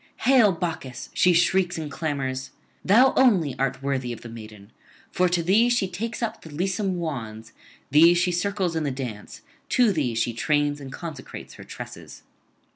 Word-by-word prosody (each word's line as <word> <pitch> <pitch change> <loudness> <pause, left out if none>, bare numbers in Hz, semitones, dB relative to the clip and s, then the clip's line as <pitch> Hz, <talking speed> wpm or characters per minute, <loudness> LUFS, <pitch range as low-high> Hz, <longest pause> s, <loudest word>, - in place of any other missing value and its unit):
'Hail, 250 -6 +5
Bacchus!' 165 -7 -5
she 180 - +4
shrieks 180 +1 +2
and 155 -2 -5
clamours; 135 -4 -3 0.3
'thou 245 +7 +5
only 190 - +4
art 135 0 -1
worthy 130 -3 -2
of 120 - -7
the 120 - -9
maiden; 110 -2 -11 0.4
for 180 0 +2
to 175 -1 0
thee 210 +8 +4
she 240 -5 +1
takes 225 +6 -5
up 225 -1 -3
the 160 - -12
lissom 185 +4 -2
wands, 115 -9 -5 0.4
thee 165 +4 +7
she 175 +1 +1
circles 185 -1 -1
in 160 - -1
the 145 - 0
dance, 125 -6 -7 0.3
to 245 -4 +4
thee 135 -8 -1
she 115 +1 0
trains 145 +3 0
and 135 -1 -8
consecrates 155 -4 -8
her - - -12
tresses.' - - -10
160 Hz, 170 wpm, -24 LUFS, 130-185 Hz, 0.4 s, thee